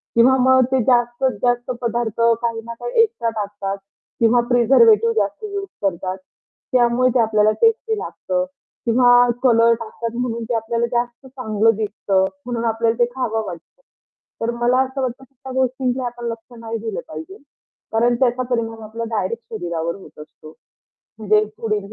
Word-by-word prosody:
किंवा 250 +3 +6
मग 260 0 +5
ते 260 -2 +3
जास्तीत 240 +2 +2
जास्त 245 0 +1
पदार्थ 235 -1 -2 0.2
काही 230 -1 -2
ना 235 - -6
काही 240 - +1
एक्स्ट्रा 430 - 0
टाकतात 205 -2 -4 0.4
किंवा 235 +1 +4
प्रिझर्व्हेटिव्ह 230 -2 +5
जास्त 205 - -1
यूज 400 -1 -4 0.2
करतात. 185 0 -1 0.5
त्यामुळे 250 0 +3
ते - - +4
आपल्याला 215 -1 +3
टेस्टी 450 -1 +2
लागतं 275 -9 -3 0.4
किंवा 245 +1 +5
कलर 230 -2 +5
टाकतात 230 0 -5
म्हणून 235 -2 -2
ते - - 0
आपल्याला 230 +1 -1
जास्त 240 +1 -2
चांगलं 225 -4 +1
दिसतं 200 -2 0 0.2
म्हणून 235 -1 -3
आपल्याला 225 +1 0
ते 240 - +5
खावं 225 -4 -1
वाटतं. 180 - -10 0.6
तर 230 - 0
मला 245 +2 +3
असं 265 +1 -4
वाटतं 260 +1 -3
की 270 - -30
त्या 265 0 -9
गोष्टीला 260 0 0
आपण 240 0 -6
लक्ष 230 +1 -7
नाही 230 0 -5
दिलं 225 - -4
पाहिजे. 380 +5 -8 0.6
कारण 240 +2 +3
त्याचा 255 -1 +2
परिणाम 225 -2 -2
आपला 230 +2 -5
डायरेक्ट 220 +3 -2
शरीरावर 170 -4 -3
होत 195 - -15
असतो. 155 +1 -13 0.6
म्हणजे 215 0 +3
पुढील 215 -2 -2
235 Hz, 155 wpm, -20 LUFS, 220-250 Hz, 0.6 s, किंवा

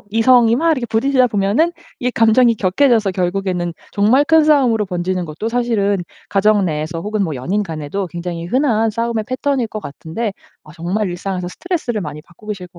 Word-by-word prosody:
뭐 - - -26
이성이 230 +1 +4
막 330 +3 +2
이렇게 255 -5 -1
부딪히다 255 +3 +3
보면은 215 +11 +1 0.3
이 250 0 0
감정이 230 +1 +4
격해져서 215 +1 +2
결국에는 180 -1 -1 0.2
정말 225 +8 +3
큰 320 -1 +5
싸움으로 255 -8 +3
번지는 180 -1 -2
것도 165 +8 -5
사실은 230 -4 +1 0.3
가정 205 -1 +3
내에서 155 +1 -3
혹은 210 +2 -2
뭐 160 -4 -3
연인 185 +12 -1
간에도 165 +2 -4
굉장히 170 0 -5
흔한 225 +1 +1
싸움의 230 0 -2
패턴일 255 -2 -1
것 215 - -6
같은데 195 +9 -5 0.3
아 150 - -14
정말 185 +5 -2
일상에서 180 0 -4
스트레스를 250 - -3
많이 150 -1 -6
받고 175 +5 -20
계실 195 -4 -5
것 175 0 -18
210 Hz, 420 characters per minute, -18 LUFS, 180-240 Hz, 0.3 s, 큰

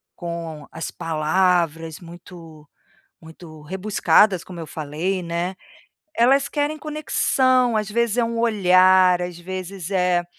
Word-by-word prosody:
com 165 -4 -7
as 165 - -6
palavras 165 0 0
muito 170 -3 -13 0.5
muito 160 -1 -13
rebuscadas, 190 +2 +2
como 180 -2 -10
eu 165 - -7
falei, 165 +4 -3
né. 170 +2 -3 0.6
Elas 270 +4 +3
querem 295 +1 -2
conexão, 260 -5 +1
às 210 -1 -2
vezes 235 +1 0
é 240 - +3
um 230 0 -3
olhar, 185 -4 +4
às 175 -1 -6
vezes 185 0 -7
é 180 -2 +1
180 Hz, 120 wpm, -22 LUFS, 165-215 Hz, 0.6 s, olhar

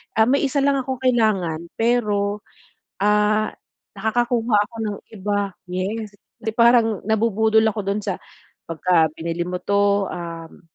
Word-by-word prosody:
ah 220 - +5
may 265 +5 +3
isa 275 +1 0
lang 280 -1 +2
akong 260 -1 -4
kailangan 215 -10 +2 0.2
pero, 210 -3 +1 0.6
ah, 210 +1 +3 0.5
nakakakuha 230 +1 +1
ako 235 - -16
ng 205 -1 -3 0.2
iba. 205 +1 -1 0.3
Yes! 200 +4 -4 0.2
'Di 220 -2 -4
parang 230 -3 +4
nabubudol 220 0 +3
ako 220 -1 0
do'n 205 +1 -1
sa, 195 - -3 0.5
pagka 165 -1 +2
binili 170 +1 -3
mo 180 - -2
to, 200 +1 +2
uhm 165 -1 -8
210 Hz, 135 wpm, -22 LUFS, 195-230 Hz, 0.6 s, ah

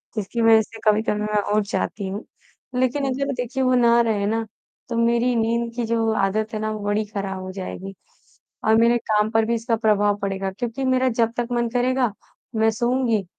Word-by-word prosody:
जिसकी 215 +2 -2
वज़ह 225 -1 +6
से 225 +1 -10
कभी-कभी 210 0 +2
मैं 210 0 0 0.2
उठ 215 - +3
जाती 200 -1 -2
हूँ। 200 +3 -5 0.5
लेक़िन 260 +2 +1
अगर 275 +1 -1
देखिए 250 +1 -2
वो 255 0 +3
ना 235 -1 +5
रहे 215 -3 0
ना 225 +2 0 0.4
तो 235 - -3
मेरी 235 +1 +2
नींद 235 +1 0
की 240 -1 -1
जो 225 0 +1
आदत 215 +3 0
है 215 - -2
ना 215 0 -2
वो 215 - -4
बड़ी 205 +1 0
ख़राब 195 -2 -4
हो 185 0 -6
जाएगी 190 0 -6 0.7
और 220 - +5
मेरे 235 +1 +4
काम 210 0 +3
पर 225 -1 +3
भी 235 +1 0
इसका 230 +1 0
प्रभाव 205 -2 +2
पड़ेगा 195 -1 -2
क्योंकि 235 +6 -4
मेरा 260 0 +2
जब 230 -1 +3
तक 240 -1 -1
मन 235 -1 0
करेगा 250 0 +1 0.4
मैं 220 0 +3
सोऊँगी। 235 -2 0
225 Hz, 195 wpm, -23 LUFS, 210-240 Hz, 0.7 s, वज़ह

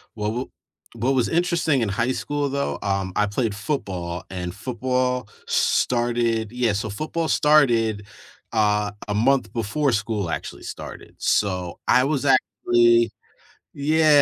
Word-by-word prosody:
Well, 105 -1 -2
wha 125 +3 -3 0.5
what 120 +4 0
was 125 -3 +2
interesting 170 -4 +1
in 115 - +1
high 115 +5 0
school 145 +2 -2
though, 140 +1 -2
um, 95 -2 -1
I 105 - +3
played 105 +1 -1
football 95 - -4
and 90 -1 -5
football 125 +1 -1 0.2
started 120 -2 +1
yeah, 120 -3 +1
so 105 +2 -2
football 155 +9 -3
started, 120 -9 +3 0.5
uh, 105 -2 +2 0.2
a 105 - -1
month 120 +2 +2
before 120 +4 0
school 105 -3 -1
actually - - -5
started, - - -9
so 90 -4 0
I 125 - +5
was 140 0 0
actually, 120 -3 +3 0.7
yeah, 150 0 +4
120 Hz, 135 wpm, -23 LUFS, 105-135 Hz, 0.7 s, I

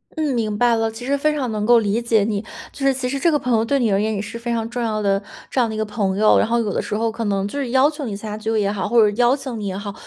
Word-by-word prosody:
嗯， 305 -3 0
明 215 -3 -1
白 240 0 +3
了， 225 0 0
其 225 +3 -9
实 280 +1 +1
非 305 +2 +1
常 255 -6 -2
能 210 -1 -2
够 240 0 +6
理 215 +2 0
解 225 -3 +2
你。 205 -1 -1 0.3
就 275 - -5
是 270 - +4
其 250 -1 -3
实 275 +1 -2
这 335 - +3
个 300 - +3
朋 255 -3 -1
友 220 0 +3
对 280 +4 +1
你 230 -5 +1
而 195 - +2
言 220 0 -1
也 195 - -2
是 215 +3 -7
非 240 0 -5
常 225 -1 -1
重 245 0 -4
要 215 -2 -1
的 195 0 +1 0.3
这 260 - 0
样 235 -2 +2
的 220 - -4
一 - - -4
个 220 - 0
朋 205 -2 -2
友， 215 0 +5
然 - - +2
后 235 +1 +1
有 210 -3 -1
的 - - -1
时 210 - -4
候 225 +1 0
可 225 +1 -4
能 195 -1 0
就 285 +8 -5
是 250 -4 -3
要 265 +2 +4
求 295 -2 -6
你 205 -3 -4
参 210 +1 -7
加 210 - -4
聚 220 +1 -4
会 220 -1 +1
也 200 0 0
好， 195 -3 -2
或 235 +1 +4
者 210 -1 +3
邀 245 +3 +4
请 260 -5 -6
你 205 - -4
也 190 0 -3
好， 200 -1 -6
225 Hz, 385 characters per minute, -21 LUFS, 210-250 Hz, 0.3 s, 够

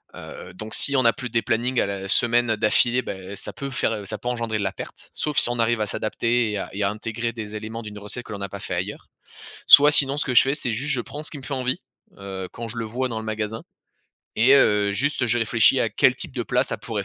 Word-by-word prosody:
Heu, - - -10
donc 110 +4 -8
si 140 - +4
on 130 - +3
n'a 115 - +5
plus 125 +1 -7
des 115 0 0
plannings 120 +3 0
à - - +1
la 100 -1 -5
semaine, 120 +2 +6
heu, 110 - 0
d'affilée, 120 +3 +2
bah, - - -5
heu, 95 +2 -9
ça - - -6
peut 140 -1 -7
faire, 120 - 0
heu, 105 -3 -5
ça 110 +2 -5
peut 120 - -5
engendrer 115 -3 -2
de - - -2
la 95 - -1
perte. - - -10
Sauf 150 -2 -3
si - - +4
on 120 -1 -2
arrive 115 -1 +1
à 105 - -1
s'adapter 115 +2 -1
et 105 - -2
à - - -5
et 100 +1 -2
à 100 - +2
intégrer 115 +2 -4
des 110 -2 -7
éléments 110 +2 -6
d'une 105 -1 -9
recette 105 +4 -3
que - - -12
l'on 100 - -6
n'a 100 - -4
pas 100 - -8
fait - - -5
ailleurs. - - -5 0.6
Soit 145 +1 +9
sinon 140 -1 +4
ce 150 - -1
que 130 - -2
je - - +9
fais, 135 +1 0
c'est 125 -6 -2
juste 135 +6 -2
je 125 - -2
prends 150 +5 -8
ce - - -1
qui 145 - -7
me 135 - -12
fait 140 - -5
envie, 130 -1 -2 0.4
heu, 95 -2 -7
quand 115 0 -7
je 115 - -6
le 115 - -3
vois 125 +4 -3
dans 115 -2 -4
le 110 - -7
magasin 110 +1 -4 0.7
et 125 +5 +6
heu, 105 -6 +3
juste, 135 +2 -1
je 120 +1 +1
réfléchis 115 -1 +3
à - - +1
quel - - +3
type - - -6
de - - -2
plat - - +1
ça - - -3
pourrait - - -5
115 Hz, 285 wpm, -23 LUFS, 105-125 Hz, 0.7 s, Soit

